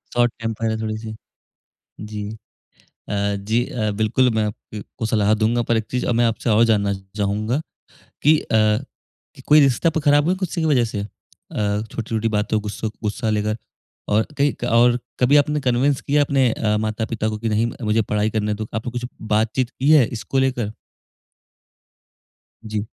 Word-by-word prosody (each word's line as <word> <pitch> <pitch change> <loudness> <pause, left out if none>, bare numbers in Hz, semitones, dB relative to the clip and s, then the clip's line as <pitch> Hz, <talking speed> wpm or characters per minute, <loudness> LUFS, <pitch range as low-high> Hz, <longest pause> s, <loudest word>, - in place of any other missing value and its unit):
Short 120 -1 +3
temper 115 0 -3
है 110 - -1
थोड़ी-सी। 110 0 -4 0.9
जी। 105 -1 -5 0.8
अ, 100 0 0
जी 115 +3 +2
अ, 110 -3 -2
बिल्कुल 110 +4 +2
मैं 110 -1 +1
आप 105 -1 -2 0.2
अ, 105 - -4 0.2
को 110 - -1
सलाह 105 -1 +2
दूँगा, 115 +2 +1
पर 115 - +1
एक 110 - 0
चीज़ 125 - -1
अब 120 - +1
मैं 120 +1 +3
आपसे 115 +1 -1
और 110 +2 +5
जानना 105 -3 +2 0.2
चाहूँगा 105 +6 0 0.6
कि 155 +2 +6
अ, - - -11 0.9
कि - - -13
कोई 150 +1 +7
रिश्ता 140 +2 +3
आपका 160 0 -2
ख़राब 145 0 +4
हुआ 175 - +2
गुस्से 175 -1 -2
की - - 0
वजह 135 -6 +3
से? 105 - -3
अ, 100 - -5 0.8
छोटी-छोटी 115 -1 -2
बातों 105 +1 0
गुस्सो 105 +1 -4
गुस्सा 110 +2 -1
लेकर 105 0 0 0.6
और 110 +1 +2
कई 140 +1 +3
क - - +1
और 120 +1 +5 0.2
कभी 130 +3 +4
आपने 150 +1 +2
कन्विन्स 130 +2 +1
किया 145 +1 +2
अपने 135 -3 +2
अ, 105 -1 0
माता-पिता 110 0 -2
को 105 - -4
कि, 115 +1 -2
"नहीं, 110 +2 +1
मुझे 110 +1 +2
पढ़ाई 105 0 0
करने 105 -1 -1
दो।" 105 +1 -5
आपने 110 +1 -3
कुछ 120 0 -4 0.3
बातचीत 115 +3 +1
की 135 +3 +1
है 150 -6 +7
इसको 120 +3 -2
लेकर? 125 -5 0 1.9
जी। 105 -1 -3
115 Hz, 175 wpm, -21 LUFS, 105-125 Hz, 1.9 s, कोई